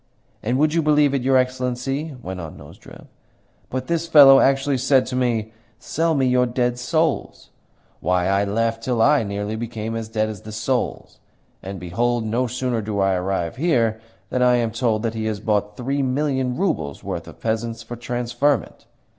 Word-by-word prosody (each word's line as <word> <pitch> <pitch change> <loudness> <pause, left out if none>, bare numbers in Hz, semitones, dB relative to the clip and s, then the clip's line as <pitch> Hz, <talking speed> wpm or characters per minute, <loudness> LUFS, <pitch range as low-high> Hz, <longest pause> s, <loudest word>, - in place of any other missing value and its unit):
"And, 120 +4 0
would 150 +2 +2
you 165 - +2
believe 150 -2 +3
it, 135 - 0
your 130 +1 +3
Excellency," 130 +3 -1
went 95 0 -5
on 80 -2 -8
Nozdrev, - - -14 0.6
"but 130 0 -3
this 170 +1 -1
fellow 140 -4 +8
actually 135 0 +2
said 130 0 +3
to 125 - -5
me, 115 -3 0 0.2
'Sell 165 +5 -1
me 135 -2 +2
your 125 0 +3
dead 120 0 -1
souls!' 160 +5 -1 0.5
Why, 90 +1 +1
I 100 +1 +2
laughed 115 +2 -1
till 120 0 -1
I 145 +4 +5
nearly 105 0 -3
became 115 -1 -4
as 115 -1 -4
dead 110 -1 0
as 105 -3 -7
the 110 - -9
souls. 120 +4 -2 0.4
And, 95 0 -7
behold, 115 +7 -1
no 120 +4 0
sooner 125 -1 -2
do 105 -1 -3
I 95 0 +3
arrive 90 -1 -2
here 115 -8 +1 0.3
than 125 - 0
I 125 0 +5
am 115 -2 0
told 110 -1 0
that 115 -1 -1
he 110 -1 -3
has 110 -2 -2
bought 105 -1 -1
three 135 +3 -1
million 130 -1 0
roubles' 120 - -2
worth - - -5
of - - -12
peasants 115 0 -2
for 120 +2 -7
transferment! 120 +4 -1
120 Hz, 180 wpm, -22 LUFS, 110-135 Hz, 0.6 s, fellow